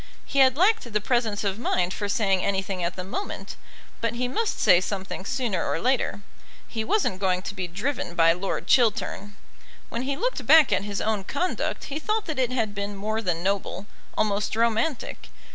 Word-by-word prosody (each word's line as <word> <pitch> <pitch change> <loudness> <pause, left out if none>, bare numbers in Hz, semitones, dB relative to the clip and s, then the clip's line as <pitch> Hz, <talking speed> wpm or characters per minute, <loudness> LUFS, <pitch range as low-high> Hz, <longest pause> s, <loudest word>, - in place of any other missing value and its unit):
He 275 - -1
had 260 0 +6
lacked 380 - +3
the 210 - +2
presence 220 -2 0
of 200 +1 -1
mind 180 -6 0
for 205 -1 -3
saying 195 -3 +2
anything 190 -2 -1
at 170 +1 -1
the 185 - -4
moment; 295 - -5 0.5
but 230 0 -1
he 250 +1 0
must 440 - -1
say 180 - +6
something 190 0 -4
sooner 240 -7 -1
or - - -1
later. 255 -3 0 0.5
He 220 -2 -3
wasn't 220 - +1
going 185 -2 +1
to - - -5
be 185 -2 -3
driven 195 +1 -3
by 165 -1 +5
Lord 185 +3 -3
Chiltern. 205 -4 +2 0.5
When 235 - -3
he 275 +2 -2
looked - - -1
back 315 0 +7
at 195 - +1
his 205 -1 -3
own 215 -3 0
conduct 350 - -2
he 290 +1 -4
thought 430 +6 -1
that 310 -5 -3
it 255 -1 +1
had 225 -5 -1
been 200 0 -4
more 215 +3 -2
than 175 -5 -1
noble, 195 0 -1 0.3
almost 210 0 0
romantic. 230 +5 0
210 Hz, 190 wpm, -25 LUFS, 195-255 Hz, 0.5 s, back